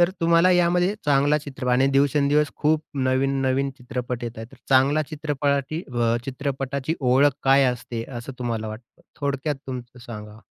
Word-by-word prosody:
तर 175 +1 +4
तुम्हाला 170 +2 +4
यामध्ये 180 +2 +3
चांगला 145 +1 +3
चित्रप 135 -3 -6
आणि 130 +2 +4
दिवसेंदिवस 145 +1 +3
खूप 155 +1 +1 0.3
नवीन-नवीन 135 +1 +1
चित्रपट 125 -1 -4
येत 115 -1 -6
आहेत 115 - -6
तर - - -14
चांगला 140 +3 +4
चित्रपाटी 145 +1 -1
अ, 115 -1 +2
चित्रपटाची 135 +2 -3
ओळख 135 +2 +4
काय 135 +1 +5
असते 115 -1 -6
असं 130 +3 -8
तुम्हाला 115 -3 -3
वाटतं? 110 +3 -11 0.2
थोडक्यात 140 +1 -1
तुमचं 125 -1 -7
सांगा? 105 -1 -9
135 Hz, 150 wpm, -24 LUFS, 125-150 Hz, 0.3 s, काय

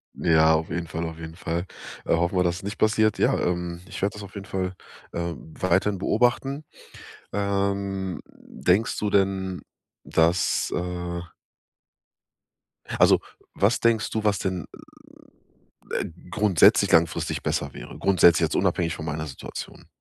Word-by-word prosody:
Ja, 80 -1 +4
auf 80 +1 -2
jeden 85 -1 -3
Fall, 80 +2 -3
auf 80 0 -8
jeden 80 0 -8
Fall. 85 +1 -3 0.4
Äh, - - +2
hoffen 85 +3 0
wir, 90 - +4
dass 85 0 0
es 100 - -10
nicht 100 +2 -5
passiert. 110 -1 +3
Ja, - - +3
ähm, 90 -1 -2
ich - - -7
werde 100 +1 +1
das 105 - -8
auf 100 - -11
jeden 100 -2 -7
Fall, 95 -2 -2 0.4
ähm, 85 -2 -5
weiterhin 95 +2 +1
beobachten. 125 +8 +1 0.7
Ähm, 100 -2 -1
denkst 100 +5 0
du 105 - 0
denn, 95 -2 +1 0.4
dass, 85 +2 +2
äh 90 -1 -3 1.8
Also, - - +6 0.3
was 100 +4 +2
denkst 115 -3 +2
du, 110 -1 -2
was 100 -3 +2
denn, 95 -3 -2 1.4
äh, - - -9 0.2
grundsätzlich 100 -5 +4
langfristig 80 -2 +2
besser - - -2
wäre? - - -9
Grundsätzlich 85 -4 +5
jetzt, - - -2
unabhängig 85 -1 +1
von 80 - -7
meiner 80 0 -3
Situation. 65 -4 -8
90 Hz, 145 wpm, -25 LUFS, 85-100 Hz, 1.8 s, Also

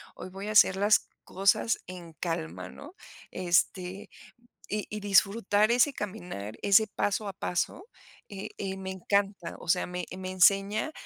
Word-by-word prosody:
hoy - - -8
voy 195 +2 -7
a - - -2
hacer 195 -2 +6
las 205 +2 +3 0.2
cosas 195 +4 +1
en 175 -2 -9
calma", 90 - -4
¿no? 300 +6 -12 0.4
Este, 185 +1 0 0.6
y 210 0 -2
y 210 - -5
disfrutar 205 +2 +3
ese 250 +4 +4
caminar, 175 - -6
ese 205 +2 +5
paso 205 0 -1
a 195 - -5
paso, 190 - -3 0.4
eh 200 -2 -7
eh, 195 -1 -4
me 190 0 -5
encanta. 195 -1 -1
O - - -12
sea, 180 +2 +2
me 180 -1 -4
me 185 0 -5
enseña 195 - +3
195 Hz, 150 wpm, -28 LUFS, 180-205 Hz, 0.6 s, hacer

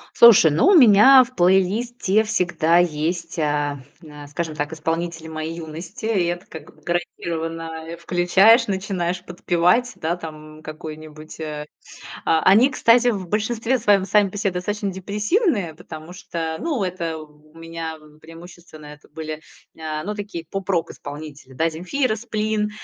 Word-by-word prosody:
Слушай, 210 -9 +8
ну, 155 - +3
у 395 - +6
меня 255 - +8
в 250 - -13
плейлисте 195 +4 +2
всегда 175 -5 +1
есть, 170 0 -1
а, 145 -2 -1 0.2
на 150 -3 -12
скажем 155 +2 -4
так, 145 +1 -3
исполнители 165 +1 -3
моей 160 +1 -5
юности. 165 +5 -8
И 205 -6 +1
это 175 +1 -3
как 160 -2 -12
бы - - -24
гарантированно, 165 -1 -4 0.2
э, 170 0 -7
включаешь, 185 +7 +4
начинаешь 190 -3 -3
подпевать. 180 +7 +1
Да, 165 +2 -2
там, 155 -2 -10
какой-нибудь 155 0 -10
а 150 -1 -5 0.6
А, 160 - +3
они, 220 +8 +6
кстати, 245 -1 +4
в 195 -6 -2
большинстве 225 +5 -1
своём 205 -4 +3
сами 205 0 +3
по 190 - -10
себе 200 -1 -1
достаточно 200 +3 -3
депрессивные, 205 - -1
потому 160 0 -10
что, 165 -3 -5
ну, 285 -11 -1
это 170 -3 -3
у 150 0 -15
у - - -13
меня, 165 -1 -6 0.2
преимущественно, 165 -1 -13
это 150 0 -14
были, 155 0 -7 0.4
а, 155 -1 -4
ну 210 +2 -3
такие 205 -5 -6
поп-рок 195 -3 -2
исполнители 145 -3 -10
да: 160 +5 +1
"Земфира", 215 - -1
"Сплин". 215 -2 -2
175 Hz, 150 wpm, -22 LUFS, 160-205 Hz, 0.6 s, Слушай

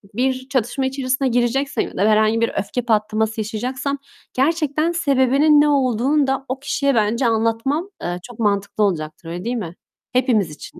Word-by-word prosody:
bir 260 +1 -1
çatışma 265 +1 0
içerisine 265 0 0
gireceksem 250 +3 0
ya - - -11
da - - -1
herhangi 215 +1 +3
bir 230 - +2
öfke 245 +5 -2
patlaması 220 -1 0
yaşayacaksam 255 +6 -3 0.4
gerçekten 310 +3 +1
sebebinin 285 -1 +4
ne 295 - +3
olduğunu 270 +1 +2
da 270 0 -1
o 265 - -3
kişiye 280 0 0
bence 225 +3 +2
anlatmam, 230 - 0
eee, 175 +1 -3
çok 240 +1 -12
mantıklı 205 -1 0
olacaktır. 160 -4 -2
Öyle 175 +3 -6
değil 240 +2 -1
mi? 180 -7 -5 0.4
Hepimiz 245 - +2
için 150 - -11
245 Hz, 160 wpm, -20 LUFS, 215-275 Hz, 0.4 s, sebebinin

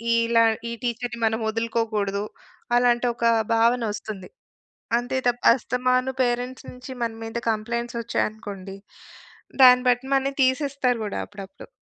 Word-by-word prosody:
ఈలా 230 0 +3 0.3
ఈ - - -3
టీచరుని 240 0 -3
మనం 220 +1 +1
వదులుకోకూడదు, 220 -3 -1 0.5
అలాంటొక 240 -1 +1 0.3
భావనొస్తుంది. 225 -4 0 0.7
అంతే 255 +2 -2
తప్ప, 245 0 -1
అస్తమాను 255 +1 0
పేరెంట్స్ 245 +2 -2
నుంచి 250 +1 -11
మన 230 - -2
మీద 225 +1 -4
కంప్లైంట్సొచ్చాయనుకోండి, 220 -3 -3 0.9
దాన్ని 250 0 +8
బట్టి 245 +2 0
మనని 275 0 +1
తీసేస్తారు 260 -2 +1
గూడా, 205 - -4
అప్పుడప్పుడు. 200 -2 -11
235 Hz, 105 wpm, -24 LUFS, 220-250 Hz, 0.9 s, దాన్ని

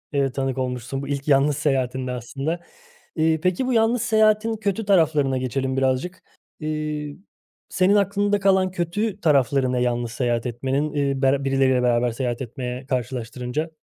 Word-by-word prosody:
ııı, 135 -1 +1
tanık 135 0 -2
olmuşsun. 130 +1 -3
Bu 140 - -6
ilk 140 0 -3
yalnız 140 0 +3
seyahatinde 130 -3 -1
aslında. 135 +7 -4 0.6
İii, 160 0 +2
peki, 185 +8 0
bu 255 - +1
yalnız 225 +1 +2
seyahatin 220 -1 +3
kötü 205 0 -2
taraflarına 155 -8 +3
geçelim 130 +1 -2
birazcık. 135 +7 -1 0.4
İii, 150 -1 -4 0.5
senin 190 +2 +3
aklında 205 0 +2
kalan 190 -1 +3
kötü 190 +4 -2
tarafları 135 -4 +2
ne 125 -1 0
yalnız 120 -1 -1
seyahat 120 -1 -1
etmenin, 135 +5 -2
iii, 140 -2 0
bera 135 +1 +2
birileriyle 135 -2 +2
beraber 120 0 +2
seyahat 120 0 -3
etmeye 125 +1 -5
karşılaştırınca? 125 +3 -3
140 Hz, 145 wpm, -23 LUFS, 130-175 Hz, 0.6 s, yalnız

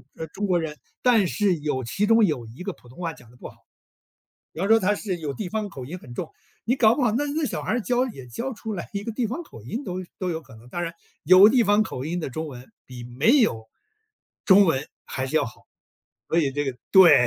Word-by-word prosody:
呃， 160 - -6
中 205 - -4
国 180 -2 +2
人， 155 -2 -4 0.2
但 230 -6 +4
是 200 0 +1
有 145 -3 -2
其 160 - -1
中 225 +1 +5
有 145 - -1
1 115 +9 -12
个 200 0 -3
普 125 - -21
通 130 - -15
话 165 -2 -3
讲 120 -6 -17
得 125 - -19
不 - - -8
好。 - - -17 1.0
比 - - -12
方 195 - 0
说 225 0 +6
他 205 +1 +2
是 190 -5 -3
有 150 -4 -3
地 195 +5 -5
方 215 +2 -2
口 135 -9 -8
音 165 +8 -7
很 125 -8 -12
重， 165 +5 -4 0.4
你 245 - +2
搞 225 -3 +5
不 285 - 0
好 230 -4 +3
那 280 +6 +1
那 300 +2 -1
小 - - -3
孩 - - -2
儿 245 - +1
教 250 +3 +1
也 135 - -9
教 235 - -4
出 220 -1 -6
来 170 - -6
一 200 -1 -4
个 230 - -3
地 240 +1 -1
方 260 +11 -5
口 115 - -13
音 225 - -5
都 185 -2 -4
都 185 -1 -2
有 160 -1 -3
可 125 -7 -16
能， 115 +2 -16
当 175 +7 -4
然， 170 -1 -3 0.3
有 185 +3 +9
地 240 +1 +4
方 205 +1 +4
口 130 -11 -5
音 170 +4 -2
的 155 - -4
中 160 +5 -4
文 125 -2 -10 0.2
比 125 -2 -9
没 135 - +3
有 110 - +1 0.8
中 200 0 +7
文 145 -4 +1 0.2
还 130 - -3
是 135 - -1
要 - - +3
好， 115 - -10 0.7
所 165 - +2
以 145 -4 +1
这 145 +1 -1
个 135 -3 -3 0.2
对， 165 -10 +8
180 Hz, 275 characters per minute, -24 LUFS, 135-220 Hz, 1.0 s, 有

